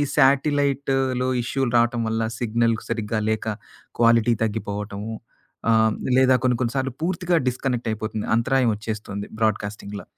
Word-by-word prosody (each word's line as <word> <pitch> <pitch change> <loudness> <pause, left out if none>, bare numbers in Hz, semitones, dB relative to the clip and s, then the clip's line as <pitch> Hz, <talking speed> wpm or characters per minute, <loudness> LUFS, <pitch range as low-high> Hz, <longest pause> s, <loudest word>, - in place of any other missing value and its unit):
శాటిలైట్‌లో 135 -2 +2 0.2
ఇష్యూలు 130 0 -1
రావటం 120 0 +2
వల్ల 115 0 -1 0.2
సిగ్నల్ 115 0 +1
సరిగ్గా 110 0 -1
లేక 110 0 -1 0.5
క్వాలిటీ 115 0 +4
తగ్గిపోవటము. 105 0 -4 0.6
ఆహ్, 115 - +5
హ్మ్. 110 - +1 0.2
లేదా 130 0 +5
కొన్ని 125 -2 +2
కొన్ని 120 -1 0
సార్లు 130 -2 -1
పూర్తిగా 175 0 +1
డిస్‍కనెక్ట్ 125 -1 -1
అయిపోతుంది. 110 0 -4
అంతరాయం 130 0 +2
వచ్చేస్తుంది 105 -1 -5
బ్రాడ్‌కాస్టింగ్‌ల. 105 -2 -2
115 Hz, 125 wpm, -23 LUFS, 110-130 Hz, 0.6 s, ఆహ్